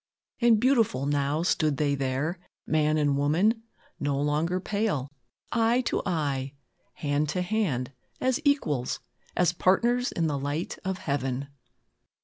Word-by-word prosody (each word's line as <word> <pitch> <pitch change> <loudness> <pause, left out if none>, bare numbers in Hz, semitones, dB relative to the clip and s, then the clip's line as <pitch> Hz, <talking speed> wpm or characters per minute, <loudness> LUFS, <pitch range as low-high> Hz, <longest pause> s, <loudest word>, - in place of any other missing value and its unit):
"And 235 -3 +5
beautiful 225 - +2
now 145 +2 +1
stood 155 -5 +1
they 145 -2 +1
there, 140 +6 -1 0.3
man 155 0 +2
and 145 -2 +2
woman; 175 +11 +2 0.4
no 140 -1 0
longer 150 +5 +1
pale; 200 - -1 0.4
eye 235 +2 +3
to - - -1
eye, 140 -6 -1 0.4
hand 145 0 -1
to 180 +4 0
hand, 175 - -1 0.3
as 260 -1 +1
equals, 155 - +1 0.4
as 180 -1 +3
partners 240 +8 +2
in 165 - 0
the 145 -3 0
light 145 +5 -3
of 190 0 -2
heaven." 140 -3 -2
155 Hz, 130 wpm, -27 LUFS, 140-200 Hz, 0.4 s, And